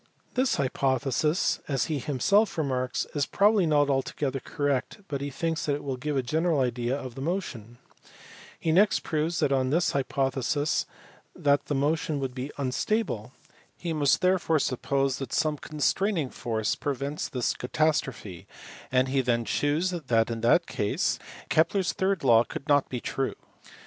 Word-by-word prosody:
This 255 0 +2
hypothesis, 135 +4 +1
as 135 -3 0
he 155 -3 -2
himself 185 - +2
remarks, 130 -4 -1
is 145 -1 0
probably 205 -3 +3
not 145 -2 +3
altogether 135 0 -1
correct, 145 - -2
but 140 -2 -3
he 140 - -3
thinks 160 +4 -2
that 145 - +2
it 145 - -7
will 135 -2 -2
give 145 +3 -2
a 130 - +1
general 160 +4 +1
idea 125 +1 0
of 130 -3 -7
the 135 - -8
motion. 135 - -4 0.8
He 160 - 0
next 195 +5 +4
proves 160 +2 -1
that 140 - +2
on 130 -1 +2
this 170 +5 +2
hypo 135 0 0
thesis 140 +4 0 0.5
the 145 0 +3 0.2
motion 150 +1 0
would 135 -2 -3
be 130 +3 -5
unstable. 135 - -1 0.4
He 170 -2 -3
must 145 -2 +2
therefore 180 -3 +2
suppose 135 0 0
that 135 - -5
some 150 -2 +1
constraining 155 +1 0
force 110 -3 -1
prevents 140 +1 -3
this 125 -2 0
catastrophe, 125 - -1 0.4
and 130 +1 +3
he 135 +1 +1
then 120 -2 0
shews 150 - +1
that 120 -10 +1
in 115 -1 -4
that 145 +9 +4
case 105 -9 -1 0.3
Kepler 165 +5 +3
s 180 - -1
third 190 -3 0
law 115 -3 +6
could 135 - -8
not 145 -2 +3
be 125 - -3
true. 135 -1 -2
140 Hz, 160 wpm, -27 LUFS, 130-160 Hz, 0.8 s, law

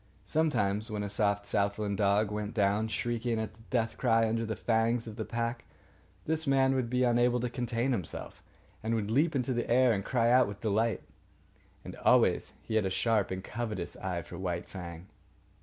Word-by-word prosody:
Sometimes, 110 -8 +1
when 105 -1 -3
a 100 - -4
soft 100 -1 +1
southland 100 0 0
dog 100 +1 +2
went 105 +1 -4
down, 105 +1 +2
shrieking 120 +1 -1
its 110 0 -5
death 115 -3 -1
cry 115 -2 +3
under 115 +1 -1
the 110 - -2
fangs 115 +1 +1
of 110 -2 -8
the - - -3
pack, 115 +1 -3 0.6
this 160 0 -1
man 135 -1 +4
would 130 -3 -1
be 125 +1 +1
unable 120 0 +3
to 120 0 -2
contain 120 +1 -1
himself, 95 -10 -4 0.4
and 115 +1 0
would 110 -1 -2
leap 150 +6 +2
into 130 -1 0
the 120 - -2
air 125 0 +5
and 100 -2 -2
cry 115 +1 +2
out 125 0 +5
with 100 0 -7
delight. 110 +2 0 0.8
And - - -7
always - - +3
he - - -6
had 105 - +2
a - - -1
sharp 105 +1 +1
and 95 0 -4
covetous 105 -5 -4
eye 90 -3 -3
for - - -9
White 90 -2 -3
Fang. 85 -2 -8
115 Hz, 190 wpm, -30 LUFS, 100-120 Hz, 0.8 s, air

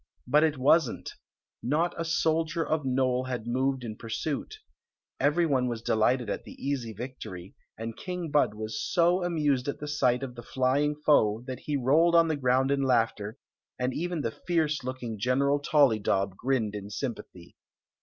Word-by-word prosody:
But 150 +5 +4
it 155 -3 +1
wasn't 135 0 +2 0.5
Not 155 +7 0
a 165 - -3
soldier 165 0 0
of 155 -1 0
Nole 130 -1 +1
had 125 -3 -4
moved 130 +1 0
m 110 -2 -5
pursuit 140 - -4 0.6
Every 150 +5 +3
one 130 -5 +1
was 115 -2 -4
delighted 120 +3 +2
at 100 - -3
the - - -11
easy 135 -5 -3
vie 125 +5 -7
tory, 95 -3 -8 0.2
and 115 0 -5
King 180 -4 -5
Bud 145 -7 +2
was 110 0 -4
so 175 +1 +2
amused 150 -7 0
at 140 - -2
the 150 - -6
sight 130 -4 +1
of 130 -2 -5
the 120 - -9
flying 135 +5 +1
foe 120 -7 +3
that 130 -1 -6
he 145 -1 -2
rolled 155 +7 +3
on 165 -1 +5
the 160 - +1
ground 130 0 +2
in 140 0 +1
laughter, 115 -3 0 0.4
and 125 +1 -1
even 175 +1 -2
the 115 - -2 0.2
fierce 155 -5 +1
looking 125 -4 -5
General 140 +5 +2
ToUydob 110 -10 +2
grinned 120 -3 -1
in 100 -1 -6
sympathy. 105 -7 -6
130 Hz, 175 wpm, -28 LUFS, 120-150 Hz, 0.6 s, on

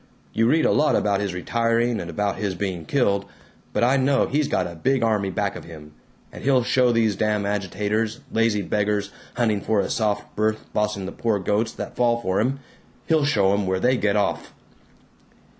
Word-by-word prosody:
You 115 +1 +2
read 160 +5 +3
a - - +4
lot 155 - +3
about 100 -2 +1
his 100 -1 -2
retiring 115 +4 0
and 85 - -7
about 100 +4 -1
his 100 -3 -2
being 90 -3 -4
killed, 100 - +1 0.5
but - - 0
I 130 +3 +4
know 135 +1 +2
he's 145 +1 0
got - - 0
a 85 - -6
big 130 +9 0
army 105 -4 +1
back 90 - -2
of - - -8
him, 75 -3 -11 0.4
and - - -10
he'll 130 -2 +3
show 125 0 +3
these 115 -3 +2
damn 105 0 0
agitators, 105 +2 -1
lazy 115 -3 +1
beggars 105 0 -1 0.2
hunting 110 -4 +1
for 110 0 +1
a 95 - -1
soft 105 -2 -1
berth 110 0 0
bossing 105 -2 -1
the 95 - -5
poor 115 -3 0
goats 105 +4 0
that - - -7
fall 120 -1 +2
for 95 -4 -1
'em, 135 +5 0 0.4
he'll 160 -3 +2
show 100 -8 +3
'em 100 -1 0
where 95 0 0
they 125 +6 +3
get 105 -4 0
off!" 105 - -1
105 Hz, 195 wpm, -23 LUFS, 100-120 Hz, 0.5 s, a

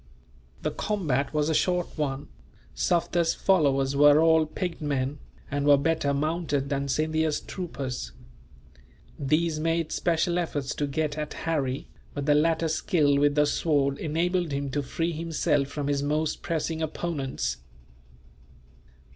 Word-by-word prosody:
The - - 0
combat 155 -10 -1
was 150 -1 +1
a 160 - +1
short 180 +3 0
one. 145 -2 -2 0.5
Sufder's 170 -1 +1
followers 140 -7 +2
were 145 +1 +7
all 160 -1 +4
picked 175 +1 -4
men, 140 -1 -1 0.3
and 145 0 0
were 145 -1 +7
better 145 0 +1
mounted 145 -1 -1
than 140 -1 -1
Scindia's 155 +2 0
troopers. 135 - -5 1.1
These 155 +3 +1
made 165 0 0
special 170 +1 +1
efforts 145 -5 -2
to 145 - -2
get 155 +1 -2
at 150 0 -4
Harry, 140 -5 -1 0.3
but 145 -1 -3
the 150 - +4
latter's 160 +1 +2
skill 145 -6 +2
with 145 0 +3
the 150 0 +4
sword 145 -2 +1
enabled 170 +2 0
him 140 0 -2
to 145 - 0
free 165 +5 -2
himself 155 -3 0
from 145 0 -4
his 140 -1 +1
most 150 +2 -1
pressing 165 -1 -2
opponents. 140 - -2
150 Hz, 140 wpm, -27 LUFS, 140-165 Hz, 1.1 s, were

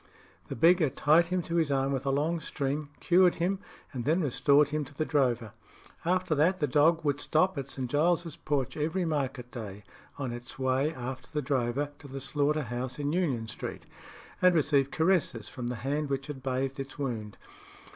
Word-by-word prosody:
The - - -5
beggar 165 +3 +5
tied 155 +5 +4
him 180 0 -1
to 170 +1 -2
his 160 -4 +2
arm 135 0 +1
with 135 0 -2
a - - +3
long 155 +5 +1
string, 145 0 -3
cured 180 0 +4
him, 185 +3 0 0.3
and 125 -3 -3
then 160 +7 +2
restored 145 +1 +4
him 150 0 -1
to 140 - -14
the 155 - -1
drover. 125 -8 +1 0.5
After 185 0 +1
that, 165 +6 +3
the 150 - +2
dog 155 +4 +3
would 145 -1 +1
stop 185 +4 +2
at 140 -2 -5
St. 130 -2 -4
Giles's 165 +4 +1
porch 140 -4 -2
every 165 +4 -1
market 135 -5 -2
day 105 -3 -7 0.3
on 130 -4 -3
its 120 +1 -8
way 130 +3 +1
after 130 -3 -6
the 150 -2 -2
drover 135 +1 0
to 145 - -11
the 135 0 -6
slaughter 145 +2 0
house 125 +1 -4
in 145 0 -1
Union 140 -11 0
Street, 110 - -6 0.6
and 180 -1 +5
receive 140 -3 +3
caresses 160 - +1
from 125 -2 -5
the 125 - -2
hand 145 +1 -1
which 135 0 -2
had 140 -2 -7
bathed 130 +1 -2
its 135 0 -6
wound. 115 -7 -4
145 Hz, 190 wpm, -29 LUFS, 130-160 Hz, 0.6 s, beggar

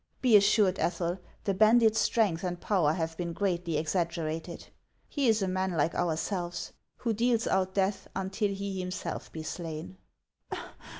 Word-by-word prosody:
Be 245 -4 +5
assured, 200 -2 +5
Ethel, 170 +2 -1 0.2
the 195 - +1
bandit's 220 +2 +5
strength 195 -7 +2
and 175 -1 -2
power 175 -8 +2
have 165 -1 -2
been 170 -1 -3
greatly 175 -4 -1
exaggerated. 165 0 -2 0.4
He 280 -3 0
is 220 -3 +3
a - - 0
man 185 0 -1
like 160 +1 +1
ourselves, 175 +1 -2 0.2
who 230 -2 -1
deals 230 +1 +2
out 190 0 0
death 195 0 0
until 195 +2 -1
he 195 -1 -4
himself 180 0 -4
be 160 - -6
slain." 155 - -6
185 Hz, 145 wpm, -29 LUFS, 170-205 Hz, 0.4 s, Be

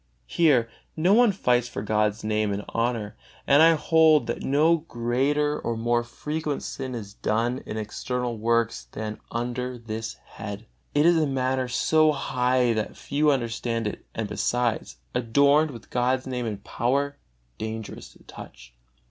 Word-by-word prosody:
Here 135 - +3 0.3
no 175 +5 +4
one 235 0 +6
fights 125 -10 +1
for 100 - -5
God's 105 0 0
Name 105 -1 0
and 100 +1 -3
honor, 115 -3 -1 0.3
and 140 +2 +5
I 165 0 +7
hold 160 -1 +4
that - - -3
no 155 +5 +3
greater 145 +2 0
or 115 -1 -3
more 120 +1 +1
frequent 150 +5 -4
sin 130 -2 -5
is 100 -3 -7
done 115 +5 -1
in 110 - -4
external 120 +3 -3
works 115 +1 0
than 110 0 -5
under 125 +1 -3
this 110 -1 -5
head. 105 +1 -9 0.3
It 145 +1 +4
is 170 0 +5
a 155 -2 +2
matter 130 -1 0
so 155 +5 +3
high 125 -3 +1
that 110 -1 -3
few 150 +2 +1
understand 115 -3 -1
it, 105 - -4
and, 110 -1 -2
besides, 110 - -1 0.2
adorned 140 +6 +3
with 115 -5 -11
God's 125 +1 +1
Name 125 -2 -3
and 105 -2 -5
power, 140 +4 -1 0.4
dangerous 110 0 -6
to - - -21
touch. - - -12
125 Hz, 155 wpm, -25 LUFS, 110-140 Hz, 0.4 s, I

